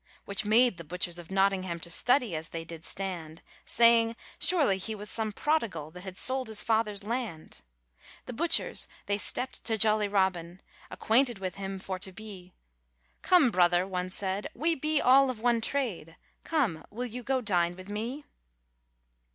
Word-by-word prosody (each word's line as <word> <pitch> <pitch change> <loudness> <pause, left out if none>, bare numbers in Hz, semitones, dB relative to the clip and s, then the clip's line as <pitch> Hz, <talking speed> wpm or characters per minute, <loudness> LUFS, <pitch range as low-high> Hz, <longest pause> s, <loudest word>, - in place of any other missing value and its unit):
Which 200 +1 -2
made 225 -1 +4
the 170 - -8
butchers 175 +2 -3
of 170 - -10
Notingharn 190 -3 +1
To 170 - -4
study 245 - +2
as 160 +1 -4
they 165 -1 -6
did 165 -1 -10
stand, 170 -5 -5 0.2
Saying, 230 0 +4 0.2
surely 285 - +3
he 220 +3 -4
was 210 0 -6
some 220 -2 -2
prodigal, 210 - -1
That 180 +2 -11
had 190 -1 -8
sold 260 0 +2
his 220 -1 +1
father's 215 -2 0
land. 225 -7 -5 0.6
The 250 - -7
butchers 330 +8 0 0.2
they 205 0 -1
stepped 255 +5 +2
to 225 -1 +1
jolly 215 -1 +3
Robin, 185 -3 0 0.3
Acquainted 240 0 +1
with 185 -1 -5
him 195 0 -5
for 185 0 -5
to 190 +1 -3
be; 185 -2 -10 0.7
'Come, 340 -10 +4
brother,' 175 -1 +3
one 185 -1 -3
said, 190 +1 -3
'we 330 +2 +1
be 305 0 +1
all 270 +1 +5
of 250 -4 -4
one 235 0 +2
trade, 220 - -2 0.3
Come, 240 - 0
will 240 +4 -4
you 250 +1 -6
go 265 +2 0
dine 175 -6 +1
with 185 +1 -11
me?' 230 +8 -5
205 Hz, 165 wpm, -29 LUFS, 180-240 Hz, 0.7 s, all